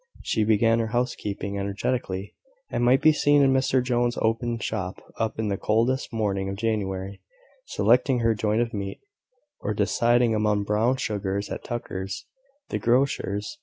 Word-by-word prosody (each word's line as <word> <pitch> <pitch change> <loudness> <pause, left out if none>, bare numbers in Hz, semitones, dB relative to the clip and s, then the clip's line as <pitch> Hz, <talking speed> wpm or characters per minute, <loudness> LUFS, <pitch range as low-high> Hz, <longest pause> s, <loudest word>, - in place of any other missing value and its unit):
She 110 - +1
began 115 +2 +3
her 115 - 0
housekeeping 105 -4 -2
energetically, 100 0 -2 0.4
and - - 0
might 125 +2 +4
be 155 - +7
seen 145 -1 +4
in 135 -1 +4
Mr 130 -1 +2
Jones's 120 -1 0
open 115 +1 0
shop 95 -4 -3 0.4
in 110 -1 -1
the 100 - -1
coldest 115 +5 +1
morning 100 -4 -1
of 95 - -3
January, 100 -3 -2 0.5
selecting 125 +3 +3
her 115 0 +3
joint 105 +2 +1
of 120 - -7
meat; 100 -2 -4 0.6
or 105 - -3
deciding 120 +3 +2
among 105 -1 +1
brown 110 +5 +1
sugars 100 -4 -2
at - - -5
Tucker's, 95 -5 -5 0.4
the - - -2
grocer's. 120 - 0
110 Hz, 150 wpm, -25 LUFS, 100-120 Hz, 0.6 s, be